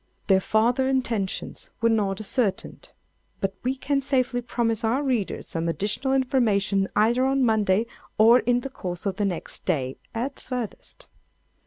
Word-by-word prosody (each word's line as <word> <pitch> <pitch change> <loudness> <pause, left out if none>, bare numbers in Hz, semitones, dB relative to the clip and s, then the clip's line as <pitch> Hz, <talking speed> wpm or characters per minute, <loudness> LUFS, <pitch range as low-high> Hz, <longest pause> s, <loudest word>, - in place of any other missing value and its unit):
Their 190 -1 +5
farther 240 +6 +2
intentions 230 -7 -2
were 230 - +3
not 205 -4 +1
ascertained; 215 -1 -2 0.5
but 195 0 -1
we 255 +2 -1
can 275 +1 0
safely 255 -2 0
promise 230 -2 -1
our 245 +6 +1
readers 245 -8 -1
some 165 0 -2
additional 210 +9 -1
information 210 -7 +2
either 235 +4 +3
on 270 0 +2
Monday 215 -2 +2 0.3
or 230 +3 +7
in 245 0 +1
the 270 - -5
course 180 -7 -6
of 195 -2 -1
the 205 - +1
next 185 -4 -3
day, 135 -7 -1 0.2
at 260 +4 -3
farthest. 250 -4 -6
225 Hz, 150 wpm, -25 LUFS, 195-255 Hz, 0.5 s, or